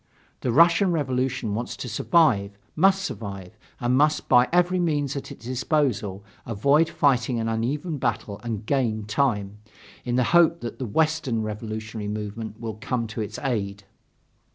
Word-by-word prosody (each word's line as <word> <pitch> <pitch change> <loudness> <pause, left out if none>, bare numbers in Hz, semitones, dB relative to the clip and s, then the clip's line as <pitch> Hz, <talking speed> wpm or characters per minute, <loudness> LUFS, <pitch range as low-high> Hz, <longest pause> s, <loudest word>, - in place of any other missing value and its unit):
The 125 - -1
Russian 170 - +5
Revolution 130 -7 -1
wants 120 +3 -4
to - - -6
survive, 110 - +2 0.2
must 195 +3 +4
survive, 100 - -6 0.2
and 120 +1 +1
must 150 +2 +2
by 125 +1 +5
every 180 +1 +3
means 145 -5 0
at 140 - -6
its 115 - -11
disposal 125 - -1 0.2
avoid 140 +8 +2
fighting 125 -4 +1
an 115 - -1
uneven 140 +8 -2
battle 115 -4 -2
and 115 -3 -4
gain 115 -5 0
time, 105 -4 0 0.4
in 120 -1 -1
the 125 - +3
hope 170 -1 +5
that 120 - -6
the 130 - -3
Western 140 -3 0
revolutionary 110 0 -5
movement 105 +1 -5
will 110 -2 -6
come 125 -2 -1
to 110 - -4
its 105 0 -5
aid. 100 -6 -2
120 Hz, 155 wpm, -25 LUFS, 110-145 Hz, 0.4 s, Russian